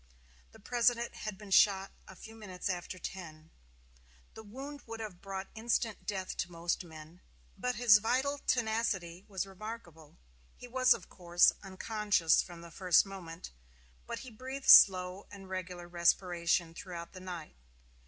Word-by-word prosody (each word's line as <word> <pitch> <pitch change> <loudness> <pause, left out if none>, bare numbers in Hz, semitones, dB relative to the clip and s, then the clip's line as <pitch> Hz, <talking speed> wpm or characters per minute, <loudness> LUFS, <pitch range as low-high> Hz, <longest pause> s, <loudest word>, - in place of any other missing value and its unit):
The - - -16
President 235 +2 +1
had 215 -3 -6
been 205 -1 -12
shot 195 0 +4 0.2
a 190 - -12
few 220 +4 -12
minutes 205 -4 -6
after 180 0 -4
ten. 165 -4 -8 0.8
The - - -10
wound 270 +7 -9
would 225 0 -7
have 210 -5 -7
brought 195 0 -5
instant 225 -1 -1
death 190 -3 -3
to 175 - -3
most 170 +1 -2
men, 160 +1 -13 0.3
but 250 0 -2
his 230 -4 +6
vital 265 +6 0
tenacity 220 -8 -1
was 195 -2 -3
remarkable. 190 -6 -10 0.4
He 245 - -10
was, 255 +1 +4
of - - -11
course, 175 -1 +3
unconscious 200 -3 +1
from 175 -1 -10
the 170 0 -12
first 180 +2 +4
moment; 180 -4 -9 0.6
but - - -5
he 255 - -10
breathed 260 +4 -7
with - - +9
slow 185 0 +7
and 195 -2 -11
regular 180 -2 -6
respiration 170 -1 +1
throughout 170 -1 -8
the 185 - -9
night. 175 - -8
190 Hz, 155 wpm, -32 LUFS, 175-220 Hz, 0.8 s, with